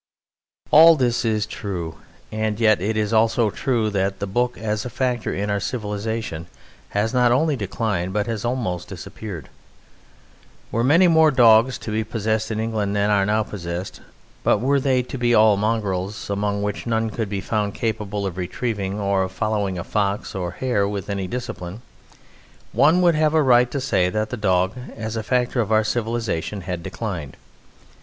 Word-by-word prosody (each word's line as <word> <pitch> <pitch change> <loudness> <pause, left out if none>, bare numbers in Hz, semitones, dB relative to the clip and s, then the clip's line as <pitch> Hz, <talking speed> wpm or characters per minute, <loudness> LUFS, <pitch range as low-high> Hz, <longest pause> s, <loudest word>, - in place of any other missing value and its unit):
All 165 +2 +9
this 125 -4 +1
is 110 -2 +1
true; 85 -5 -5 0.3
and 110 0 -2
yet 110 -4 +4
it 110 +3 -1
is 105 0 0
also 110 0 +3
true 115 -5 0
that 95 -1 -1
the 100 - -3
Book 120 +5 -1
as 105 -1 -2
a 125 - -5
factor 125 -1 -1
in 105 +2 -2
our 100 - 0
civilization 105 -6 -4 0.4
has 105 +3 -1
not 125 -1 +4
only 150 +4 +2
declined 100 -4 -2
but 105 +1 0
has 115 -3 -3
almost 120 -8 -2
disappeared. 95 -10 -8 1.2
Were 115 - 0
many 165 +8 +5
more 160 -2 +5
dogs 120 -2 +5
to 110 - -7
be 110 +1 0
possessed 110 0 -1
in 110 -1 -2
England 110 -3 -1
than 100 +1 +2
are 100 -1 +3
now 110 +1 +2
possessed, 90 -2 -6 0.4
but - - +4
were 135 +6 +2
they 130 -2 +1
to 130 +1 -7
be 120 -1 +3
all 110 -1 +6
mongrels, 100 -2 -2
among 100 0 -1
which 105 +3 -3
none 110 -1 0
could 110 -3 -3
be 100 -1 -2
found 105 +1 -2
capable 105 -3 -2
of 95 -2 -4
retrieving, 100 +2 -3
or 100 -1 +1
of 95 0 -2
following 100 -2 -1
a 85 - -4
fox 100 -1 -1
or 90 -2 -3
a - - -9
hare 105 -2 0
with 100 -1 -4
any 100 -2 -2
discipline, 115 -3 -6 0.9
one 160 +6 +4
would 170 -1 +5
have 155 0 +2
a 155 - +4
right 125 -2 +5
to 140 - -3
say 95 -9 +1
that 110 +3 -2
the - - -2
dog 95 -3 +1 0.2
as 110 0 -4
a 110 - -1
factor 125 +2 0
of 110 - -3
our 110 0 +4
civilization 110 -5 -2
had 90 -1 -4
declined. 85 - -5
110 Hz, 180 wpm, -22 LUFS, 100-120 Hz, 1.2 s, All